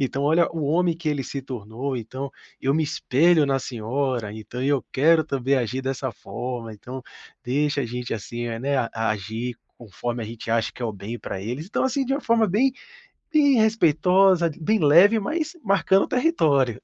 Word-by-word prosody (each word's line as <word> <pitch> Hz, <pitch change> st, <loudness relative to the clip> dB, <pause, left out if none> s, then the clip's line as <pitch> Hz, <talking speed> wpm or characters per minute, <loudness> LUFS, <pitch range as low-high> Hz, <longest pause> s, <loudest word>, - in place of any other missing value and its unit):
"Então 135 Hz, 0 st, -1 dB
olha 160 Hz, +4 st, +3 dB
o 160 Hz, -3 st, -3 dB
homem 170 Hz, +3 st, +2 dB
que 170 Hz, -1 st, -11 dB
ele 145 Hz, -2 st, -1 dB
se 135 Hz, +1 st, -5 dB
tornou, 125 Hz, +2 st, -5 dB
então, 130 Hz, +4 st, -6 dB, 0.3 s
eu 135 Hz, -, +1 dB
me 160 Hz, -, +2 dB
espelho 155 Hz, +2 st, +3 dB
na 135 Hz, -1 st, +1 dB
senhora, 120 Hz, -2 st, -2 dB
então 110 Hz, +4 st, -7 dB
eu 140 Hz, -1 st, +1 dB
quero 160 Hz, +4 st, +4 dB
também 135 Hz, -2 st, 0 dB
agir 130 Hz, +1 st, -1 dB
dessa 135 Hz, 0 st, -2 dB
forma, 120 Hz, -1 st, -6 dB
então 125 Hz, +5 st, -8 dB, 0.4 s
deixa 140 Hz, +2 st, 0 dB
a -, -, -3 dB
gente, 125 Hz, 0 st, -4 dB
assim, 120 Hz, +2 st, -5 dB
né, 140 Hz, +3 st, -1 dB, 0.2 s
agir 110 Hz, +2 st, -2 dB, 0.2 s
conforme 120 Hz, +1 st, -5 dB
a 110 Hz, -, -5 dB
gente 115 Hz, 0 st, -7 dB
acha 115 Hz, 0 st, +1 dB
que -, -, -16 dB
é -, -, 0 dB
o 110 Hz, -, -2 dB
bem 105 Hz, +4 st, -7 dB
para 95 Hz, -, -6 dB
eles". 125 Hz, -, -5 dB
Então, 215 Hz, -, -1 dB
assim, 265 Hz, +1 st, 0 dB
de 270 Hz, -, -1 dB
uma 285 Hz, -, -2 dB
forma 230 Hz, -1 st, +3 dB
bem 250 Hz, +8 st, +2 dB, 0.6 s
bem 285 Hz, -5 st, +5 dB
respeitosa, 185 Hz, -3 st, +4 dB
bem 215 Hz, +8 st, +2 dB
leve 175 Hz, +9 st, +6 dB
mas 310 Hz, -, -3 dB
marcando 195 Hz, -1 st, +3 dB
território. 150 Hz, -, +2 dB
135 Hz, 180 wpm, -24 LUFS, 120-175 Hz, 0.6 s, leve